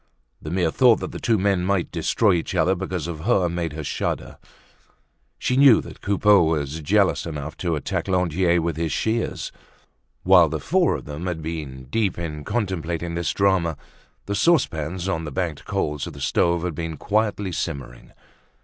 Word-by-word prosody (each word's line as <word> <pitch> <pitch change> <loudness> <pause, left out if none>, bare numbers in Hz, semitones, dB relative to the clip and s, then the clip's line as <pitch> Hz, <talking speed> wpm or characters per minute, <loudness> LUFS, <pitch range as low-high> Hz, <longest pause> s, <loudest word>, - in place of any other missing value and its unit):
The 75 - -6
mere 85 -1 +1
thought 125 +2 +5
that - - -4
the - - -7
two 115 -2 +2
men 95 -2 +1
might 95 -2 0
destroy 95 +5 +2
each 85 -2 -2
other 95 - +3
because 95 -3 -3
of 85 -2 -5
her 95 0 +2
made 85 -2 -3
her 80 0 -5
shudder. - - -3 1.0
She 125 - -1
knew 135 -4 +7
that - - -10
Coupeau 100 0 +4
was 80 -2 0
jealous 85 -1 +2
enough 75 0 -5
to 85 -3 -1
attack 75 - -3
Lantier 90 -2 +2
with 85 -2 -2
his 80 -2 -1
shears. 110 +7 -1 0.7
While - - +6
the - - -3
four - - +2
of - - -7
them 75 +5 -6
had 85 -3 -3
been 75 -5 -5
deep 105 -5 0
in 75 -3 -5
contemplating 85 -6 -2
this 85 0 -1
drama, 95 -6 +1 0.5
the 100 - -3
saucepans 95 - +1
on 80 -4 -1
the 75 - -5
banked 80 -1 -3
coals 75 -2 -2
of - - -8
the 70 - -11
stoves 85 +5 +1
had 90 -2 -2
been 80 0 -5
quietly 105 -1 0
simmering. 70 -8 -5
85 Hz, 175 wpm, -23 LUFS, 80-95 Hz, 1.0 s, knew